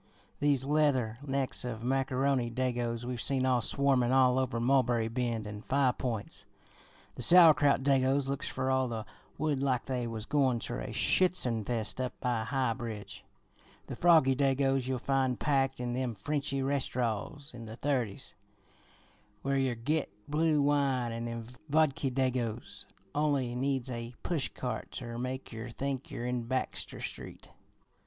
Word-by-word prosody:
These 140 Hz, -3 st, +2 dB
leather 135 Hz, -6 st, +1 dB
necks 135 Hz, -2 st, -1 dB
of 115 Hz, -2 st, -5 dB
Macaroni 135 Hz, -1 st, +1 dB
Dagos 120 Hz, -1 st, -2 dB
we've 125 Hz, -1 st, -3 dB
seen 130 Hz, -2 st, +2 dB
a 125 Hz, -2 st, +3 dB
swarmin' 130 Hz, -1 st, +2 dB
all 130 Hz, -1 st, +4 dB
over 130 Hz, -2 st, -1 dB
Mulberry 120 Hz, -2 st, +2 dB
Bend 115 Hz, -2 st, -2 dB
an' 105 Hz, 0 st, -7 dB
Five 135 Hz, +1 st, +1 dB
Points; 115 Hz, -5 st, -4 dB, 0.7 s
the -, -, -8 dB
Sauerkraut 150 Hz, -6 st, +6 dB
Dagos 135 Hz, 0 st, +2 dB
looks 140 Hz, 0 st, -2 dB
fer 130 Hz, 0 st, -1 dB
all 130 Hz, -1 st, +2 dB
the 110 Hz, -2 st, -4 dB, 0.3 s
woild 150 Hz, -2 st, 0 dB
like 130 Hz, -3 st, 0 dB
they 125 Hz, -3 st, -2 dB
was 110 Hz, -1 st, -5 dB
goin' 135 Hz, -4 st, +2 dB
ter -, -, -4 dB
a -, -, -5 dB
Schützenfest 120 Hz, -, +1 dB
up 125 Hz, -, -5 dB
by 120 Hz, -3 st, 0 dB
High 130 Hz, -1 st, 0 dB
Bridge; 110 Hz, -4 st, -7 dB, 0.6 s
the -, -, -6 dB
Froggie 160 Hz, -6 st, +5 dB
Dagos 135 Hz, -1 st, +1 dB
you'll 130 Hz, -1 st, 0 dB
find 130 Hz, -1 st, 0 dB
packed 135 Hz, -2 st, +1 dB
in 120 Hz, -1 st, -2 dB
them 125 Hz, -2 st, -2 dB
Frenchy 140 Hz, +5 st, -2 dB
restaraws 130 Hz, -1 st, -2 dB
in 120 Hz, -2 st, -9 dB
the 110 Hz, -, -7 dB
Thirties 125 Hz, -6 st, -2 dB, 1.1 s
where 135 Hz, 0 st, +1 dB
yer 130 Hz, -2 st, +1 dB
git 145 Hz, +6 st, -1 dB, 0.2 s
blue 150 Hz, 0 st, +2 dB
wine 135 Hz, -4 st, +1 dB
and 115 Hz, +1 st, -4 dB
them 115 Hz, -1 st, -5 dB, 0.2 s
Vodki 145 Hz, -2 st, +2 dB
Dagos 125 Hz, -3 st, -2 dB, 0.3 s
only 140 Hz, -5 st, +1 dB
needs 130 Hz, 0 st, -1 dB
a 120 Hz, 0 st, -6 dB
pushcart 125 Hz, -6 st, -3 dB
ter 120 Hz, -2 st, -5 dB
make 130 Hz, +1 st, -4 dB
yer 115 Hz, +1 st, -6 dB
think 135 Hz, +2 st, -4 dB
yer 120 Hz, -, -5 dB
in 125 Hz, -1 st, -2 dB
Baxter 130 Hz, 0 st, -2 dB
Street.' -, -, -6 dB
130 Hz, 150 wpm, -31 LUFS, 120-140 Hz, 1.1 s, Sauerkraut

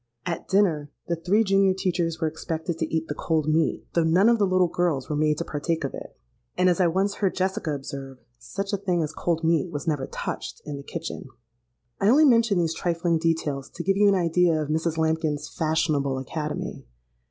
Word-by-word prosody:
At 170 Hz, -, -4 dB
dinner, 170 Hz, -7 st, +2 dB, 0.2 s
the 170 Hz, -, -1 dB
three 180 Hz, +7 st, +2 dB
junior 195 Hz, -2 st, +3 dB
teachers 175 Hz, -3 st, -1 dB
were 160 Hz, -, +1 dB
expected 160 Hz, +1 st, -4 dB
to 160 Hz, -, -2 dB
eat 160 Hz, 0 st, -1 dB
the -, -, -3 dB
cold 155 Hz, 0 st, -1 dB
meat; 155 Hz, 0 st, +1 dB
though 170 Hz, -, +3 dB
none 180 Hz, +7 st, +4 dB
of 235 Hz, -1 st, +3 dB
the 200 Hz, -, +3 dB
little 185 Hz, -1 st, +3 dB
girls 165 Hz, -6 st, -1 dB
were 150 Hz, -, -2 dB
made 150 Hz, 0 st, +2 dB
to 170 Hz, -, -3 dB
partake 160 Hz, +2 st, -2 dB
of 135 Hz, -, -3 dB
it, -, -, -9 dB, 0.4 s
and, 185 Hz, -, +3 dB
as 180 Hz, +1 st, +2 dB
I 180 Hz, -, +5 dB
once 195 Hz, +4 st, 0 dB
heard 195 Hz, -3 st, 0 dB
Jessica 185 Hz, -5 st, -1 dB
observe, 135 Hz, -1 st, -7 dB, 0.2 s
'such 195 Hz, +1 st, -5 dB
a -, -, +2 dB
thing 180 Hz, -4 st, 0 dB
as 155 Hz, +1 st, -4 dB
cold 170 Hz, -1 st, -1 dB
meat 165 Hz, +1 st, +2 dB
was 145 Hz, -1 st, -5 dB
never 145 Hz, -4 st, 0 dB
touched -, -, -5 dB
in 145 Hz, -1 st, -5 dB
the -, -, -7 dB
kitchen.' 135 Hz, -, -6 dB, 0.7 s
I 200 Hz, -, +3 dB
only 295 Hz, +6 st, +6 dB
mention 230 Hz, -6 st, +4 dB
these 165 Hz, -2 st, +1 dB
trifling 170 Hz, -1 st, 0 dB
details 155 Hz, -4 st, -1 dB
to 170 Hz, -, -7 dB
give 195 Hz, +3 st, +2 dB
you 205 Hz, +1 st, +4 dB
an 200 Hz, -, +5 dB
idea 170 Hz, -2 st, +2 dB
of 150 Hz, -1 st, -3 dB
Mrs. 160 Hz, +1 st, 0 dB
Lambkin's 160 Hz, -2 st, 0 dB
fashionable 155 Hz, -4 st, 0 dB
academy. 150 Hz, +3 st, -4 dB
165 Hz, 210 wpm, -25 LUFS, 155-185 Hz, 0.7 s, only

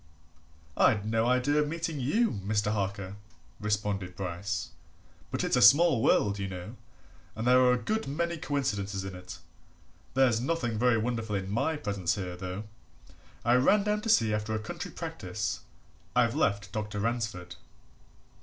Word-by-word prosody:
"I'd 105 Hz, -5 st, +3 dB
no 110 Hz, +1 st, +1 dB
idea 125 Hz, +4 st, +2 dB
of 150 Hz, -, 0 dB
meeting 165 Hz, -1 st, -3 dB
you, 215 Hz, -, +2 dB
Mr. 105 Hz, +1 st, -1 dB
Harker," 100 Hz, -1 st, -3 dB, 0.4 s
responded 105 Hz, -3 st, -2 dB
Bryce. 90 Hz, 0 st, -4 dB, 0.6 s
"But -, -, -2 dB
it's -, -, +1 dB
a -, -, +3 dB
small 140 Hz, +3 st, +7 dB
world, 100 Hz, -2 st, +3 dB
you 100 Hz, -, -2 dB
know, 95 Hz, +4 st, -7 dB, 0.6 s
and 110 Hz, +1 st, -4 dB
there 125 Hz, +1 st, +6 dB
are 125 Hz, -1 st, +5 dB
a -, -, +2 dB
good 220 Hz, -, -2 dB
many 170 Hz, +4 st, -1 dB
coincidences 105 Hz, -10 st, -2 dB
in 95 Hz, -, -6 dB
it. 90 Hz, 0 st, -9 dB, 0.8 s
There's 125 Hz, -4 st, +4 dB
nothing 125 Hz, -6 st, -1 dB
very 125 Hz, -1 st, +4 dB
wonderful 110 Hz, -2 st, -2 dB
in 95 Hz, 0 st, -3 dB
my 135 Hz, +9 st, 0 dB
presence 100 Hz, -, -1 dB
here, 90 Hz, -3 st, -4 dB
though 90 Hz, +3 st, -5 dB, 0.8 s
I 120 Hz, -, +4 dB
ran 195 Hz, +11 st, +4 dB
down 210 Hz, 0 st, 0 dB
to 225 Hz, -, -4 dB
see 115 Hz, -, +4 dB
after 105 Hz, +1 st, -1 dB
a -, -, -1 dB
country 110 Hz, -, -6 dB
practice -, -, -4 dB, 0.6 s
I've 120 Hz, -1 st, +3 dB
left 100 Hz, -2 st, 0 dB
Dr. 105 Hz, 0 st, -4 dB
Ransford." 115 Hz, -6 st, -3 dB
110 Hz, 155 wpm, -29 LUFS, 100-130 Hz, 0.8 s, small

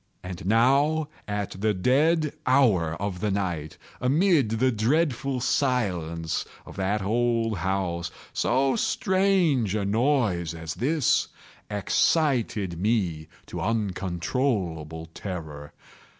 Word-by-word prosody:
And 90 Hz, -1 st, -6 dB
now 140 Hz, +8 st, +3 dB, 0.2 s
at 105 Hz, -1 st, -3 dB
the 110 Hz, -1 st, +2 dB
dead 150 Hz, -, +2 dB
hour 105 Hz, -, +3 dB
of 100 Hz, -2 st, -3 dB
the 105 Hz, -, -1 dB
night, 90 Hz, -6 st, -2 dB, 0.2 s
amid 145 Hz, -, +3 dB
the 120 Hz, +4 st, +2 dB
dreadful 135 Hz, +3 st, 0 dB
silence 90 Hz, -, 0 dB, 0.2 s
of -, -, -11 dB
that 95 Hz, +2 st, 0 dB
old 115 Hz, -1 st, 0 dB
house, 90 Hz, -2 st, -1 dB, 0.2 s
so 135 Hz, +2 st, +2 dB
strange 185 Hz, -, +2 dB
a 105 Hz, -2 st, -1 dB
noise 105 Hz, -, +1 dB
as 80 Hz, -1 st, -5 dB
this 135 Hz, -, +1 dB, 0.4 s
excited 105 Hz, -, +1 dB
me 95 Hz, -8 st, 0 dB, 0.2 s
to -, -, -6 dB
uncontrollable 90 Hz, -, -2 dB
terror. 75 Hz, -6 st, -7 dB
110 Hz, 105 wpm, -26 LUFS, 90-130 Hz, 0.4 s, now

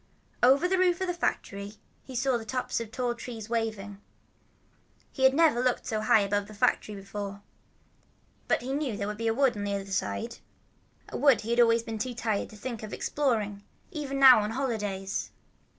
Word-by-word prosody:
Over 275 Hz, +7 st, +5 dB
the 375 Hz, 0 st, +1 dB
roof 360 Hz, -1 st, +3 dB
of -, -, +1 dB
the 355 Hz, -, -1 dB
factory 205 Hz, -, -3 dB, 0.3 s
he 260 Hz, -, -10 dB
saw 260 Hz, +1 st, +1 dB
the 235 Hz, -, -2 dB
tops 250 Hz, +3 st, -2 dB
of 230 Hz, -2 st, -6 dB
tall 245 Hz, 0 st, -1 dB
trees 230 Hz, -2 st, -8 dB
waving. 215 Hz, -3 st, -3 dB, 1.1 s
He 265 Hz, -, +1 dB
had 265 Hz, +1 st, +5 dB
never 305 Hz, -6 st, +4 dB
looked 250 Hz, -1 st, 0 dB
so 215 Hz, -1 st, -2 dB
high 215 Hz, 0 st, +5 dB
above 200 Hz, 0 st, -1 dB
the 215 Hz, -, -12 dB
factory 210 Hz, +1 st, +1 dB
before. 200 Hz, 0 st, -7 dB, 1.0 s
But -, -, +1 dB
he 265 Hz, +2 st, -3 dB
knew 275 Hz, -7 st, -2 dB
there 200 Hz, -, -3 dB
was 210 Hz, 0 st, -4 dB
a 230 Hz, -, +1 dB
wood 250 Hz, +1 st, +2 dB
on 205 Hz, -, -4 dB
the 200 Hz, 0 st, -1 dB
other 195 Hz, -1 st, -4 dB
side, 100 Hz, -, -2 dB, 0.7 s
a -, -, -5 dB
wood 275 Hz, -4 st, +4 dB
he 225 Hz, -, -4 dB
had 235 Hz, -, +1 dB
always 230 Hz, -1 st, +5 dB
been 225 Hz, -1 st, -5 dB
too 245 Hz, +2 st, -3 dB
tired 220 Hz, -3 st, -1 dB
to -, -, -13 dB
think 235 Hz, +1 st, -5 dB
of 215 Hz, -1 st, -7 dB
exploring, 215 Hz, -8 st, -1 dB, 0.3 s
even 275 Hz, -5 st, -3 dB
on 240 Hz, -6 st, +8 dB
holidays. 210 Hz, -6 st, -3 dB
230 Hz, 190 wpm, -28 LUFS, 205-260 Hz, 1.1 s, on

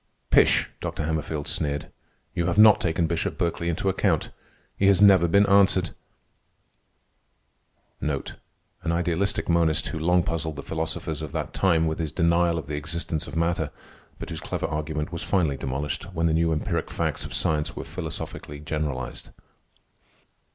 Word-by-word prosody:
"Pish!" -, -, +5 dB
Dr. -, -, -3 dB
Hammerfield 80 Hz, -1 st, -2 dB
sneered. 75 Hz, -5 st, -2 dB, 0.4 s
"You 85 Hz, 0 st, 0 dB
have 85 Hz, -, 0 dB
not 110 Hz, -1 st, +8 dB
taken 85 Hz, 0 st, +1 dB
Bishop 80 Hz, 0 st, -2 dB
Berkeley 85 Hz, 0 st, -1 dB
into 85 Hz, +3 st, -2 dB
account. 95 Hz, -, +1 dB, 0.5 s
He 95 Hz, -, +2 dB
has 100 Hz, -2 st, +5 dB
never 95 Hz, -4 st, +7 dB
been 100 Hz, +4 st, +5 dB
answered." 95 Hz, -3 st, +4 dB, 2.1 s
An 70 Hz, -3 st, -1 dB, 0.7 s
idealistic 85 Hz, +3 st, 0 dB
monist 85 Hz, -2 st, +2 dB
who 80 Hz, -, -4 dB
long 90 Hz, +2 st, +3 dB
puzzled 80 Hz, -2 st, -2 dB
the 70 Hz, -, -7 dB
philosophers 80 Hz, -1 st, -3 dB
of 75 Hz, -3 st, -6 dB
that -, -, -3 dB
time 85 Hz, -4 st, +3 dB
with 80 Hz, 0 st, -2 dB
his 80 Hz, -3 st, -2 dB
denial 85 Hz, 0 st, +2 dB
of 80 Hz, -, -4 dB
the 75 Hz, 0 st, -4 dB
existence 80 Hz, +1 st, -3 dB
of -, -, -8 dB
matter, 85 Hz, -1 st, 0 dB, 0.5 s
but -, -, -7 dB
whose -, -, -5 dB
clever -, -, -3 dB
argument 75 Hz, 0 st, -3 dB
was 85 Hz, -1 st, -4 dB
finally 85 Hz, -5 st, +1 dB
demolished 70 Hz, +3 st, -3 dB
when 80 Hz, +1 st, +1 dB
the 80 Hz, -, +3 dB
new 80 Hz, 0 st, +2 dB
empiric 75 Hz, -, -1 dB
facts -, -, -2 dB
of -, -, -8 dB
science 75 Hz, +1 st, 0 dB
were -, -, -5 dB
philosophically 80 Hz, -3 st, -6 dB
generalized. 75 Hz, -4 st, -4 dB
80 Hz, 155 wpm, -25 LUFS, 75-85 Hz, 2.1 s, not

